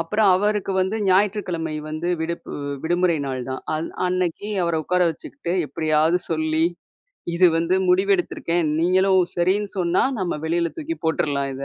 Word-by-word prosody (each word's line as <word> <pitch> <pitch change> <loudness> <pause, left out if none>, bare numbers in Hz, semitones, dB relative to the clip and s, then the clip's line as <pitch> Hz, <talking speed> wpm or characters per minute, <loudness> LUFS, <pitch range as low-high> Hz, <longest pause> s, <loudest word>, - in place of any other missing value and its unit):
அப்பறம் 200 +4 +2
அவருக்கு 205 0 0
வந்து 190 +4 0
ஞாயிற்றுக்கிழமை 185 -5 +1 0.2
வந்து 155 +3 -3
விடுப்பு. 170 +1 -4
வி 145 0 -5 0.2
விடுமுறை 175 0 +2
நாள் 130 -2 -3
தான். 130 - -5
அந் 160 +2 -3 0.2
அன்னக்கி 185 +2 -1
அவர 170 -1 0
உக்கார 180 +4 0
வச்சுக்கிட்டு 170 +2 -6
எப்படியாது 155 +2 +2
சொல்லி 155 0 +1 0.7
"இது 180 +2 +5
வந்து 170 +3 +1
முடிவெடுத்திருக்கேன். 180 -3 +1
நீங்களும் 185 +2 +4 0.2
சரின்னு 195 +4 +1
சொன்னா 175 0 +2 0.2
நம்ம 175 -4 -2
வெளில 170 +1 0
தூக்கி 325 +1 -4
போட்டுறலாம் 140 -3 0
இத." 135 +1 -5
175 Hz, 145 wpm, -22 LUFS, 160-185 Hz, 0.7 s, இது